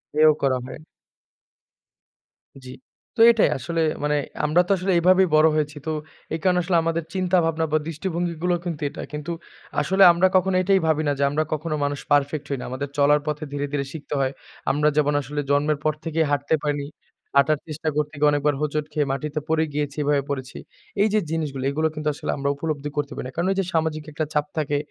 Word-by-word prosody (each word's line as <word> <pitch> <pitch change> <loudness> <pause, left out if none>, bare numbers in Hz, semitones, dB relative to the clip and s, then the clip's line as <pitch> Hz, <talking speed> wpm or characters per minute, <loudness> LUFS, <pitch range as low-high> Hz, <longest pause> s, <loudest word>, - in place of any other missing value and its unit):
হেও 155 +1 +6
করা 135 -2 +2
হয়। 130 - -8 1.9
জ্বি। 125 - -8 0.4
তো 225 - +1
এটাই 230 - +3
আসলে 165 +6 -2 0.2
মানে 150 0 +1 0.3
আমরা 155 +4 +4
তো - - -1
আসলে 190 +2 -1
এভাবেই 185 +2 +5
বড় 155 +1 +6
হয়েছি। 150 -1 -1
তো 160 - -1 0.4
এই 160 - -1
কারণে 180 -1 +3
আসলে 175 -1 +2
আমাদের 165 0 -1
চিন্তা 185 -1 +1
ভাবনা 160 0 0
বা 155 - +4
দৃষ্টিভঙ্গিগুলো 170 +1 -2
কিন্তু 165 -4 -4
এটা। - - -8
কিন্তু 150 +3 -5 0.5
আসলে 190 +1 +4
আমরা 170 +2 +3
কখনো 185 0 +3
এটাই 195 +1 +4
ভাবি 155 0 +2
না - - +3
যে - - +2
আমরা 150 +2 0
কখনো 155 +1 -2
মানুষ 145 -1 -1
পারফেক্ট 145 0 +2
হই 140 - -1
না। - - -6
আমাদের 135 +3 -4
চলার 145 +1 +5
পথে 150 +1 -2
ধীরে, 145 0 -2
ধীরে 140 -1 -1
শিখতে 150 -1 -7
হয়। 130 -1 +1 0.4
আমরা 150 +2 +2
যেমন 145 -1 +3
আসলে 145 +2 -4
জন্মের 145 +1 +2
পর 155 - +2
থেকেই 160 0 0
হাঁটতে 145 +2 +1
পারিনি। 145 -1 -1 0.5
হাঁটার 145 +2 +4
চেষ্টা 155 0 -3
করতে 150 +1 -1
গিয়ে 150 - +5
অনেকবার 145 0 +1
হোঁচট 150 0 -1
খেয়ে 150 -2 +1
মাটিতে 150 +2 -3
পড়ে 160 0 +2
গিয়েছি 145 0 -2
এভাবে 145 0 +2
করেছি। 130 -2 -4 0.4
এই 210 - +5
যে 215 - +4
জিনিসগুলি 145 -5 -2
এগুলো 155 +3 +1
কিন্তু 155 0 -4
আসলে - - -4
আমরা 140 0 -1
উপলব্ধি 145 -1 -3
করতে 145 0 -1
পারি - - -5
না। - - -8
কারণ 170 +3 0
এই - - -8
যে 195 - +1
সামাজিক 160 -1 0
একটা 155 +1 -2
চাপ 150 0 +1
থাকে, 145 -2 0
150 Hz, 200 wpm, -23 LUFS, 145-165 Hz, 1.9 s, হেও